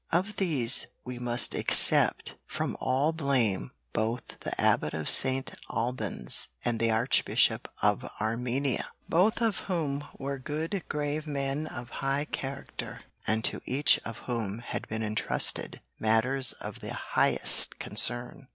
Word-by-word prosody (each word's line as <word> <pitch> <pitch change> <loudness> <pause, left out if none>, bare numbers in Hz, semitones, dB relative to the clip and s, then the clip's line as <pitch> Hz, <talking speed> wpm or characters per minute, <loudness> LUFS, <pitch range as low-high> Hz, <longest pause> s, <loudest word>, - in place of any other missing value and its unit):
Of 185 +5 0
these 140 -10 +5 0.2
we 125 -1 -7
must 120 0 +2
except - - +4
from - - -3
all 140 +5 +1
blame 135 - 0 0.2
both 115 +2 -3
the - - -6
Abbot 75 - +2
of 80 -1 -3
St. 130 0 +4 0.2
Albans 120 - 0 0.2
and 120 -2 0
the 115 - +2
Archbishop 115 +3 +2
of - - +1
Armenia, 125 +5 -2 0.2
both 200 +7 +2
of 225 -4 0
whom 145 -6 -2
were 140 0 -5
good 160 +7 -4
grave 150 +1 -3
men 140 +1 -3
of 120 -3 -9
high 140 +2 0
character 135 -2 -7 0.3
and 110 +1 0
to - - 0
each 140 +3 +4
of 115 -1 -8
whom 110 -5 -3
had - - -5
been 110 0 -4
entrusted 110 0 +1 0.2
matters 120 +4 +2
of - - -9
the - - -6
highest - - +3
concern. 120 +2 -2
130 Hz, 135 wpm, -28 LUFS, 115-145 Hz, 0.3 s, these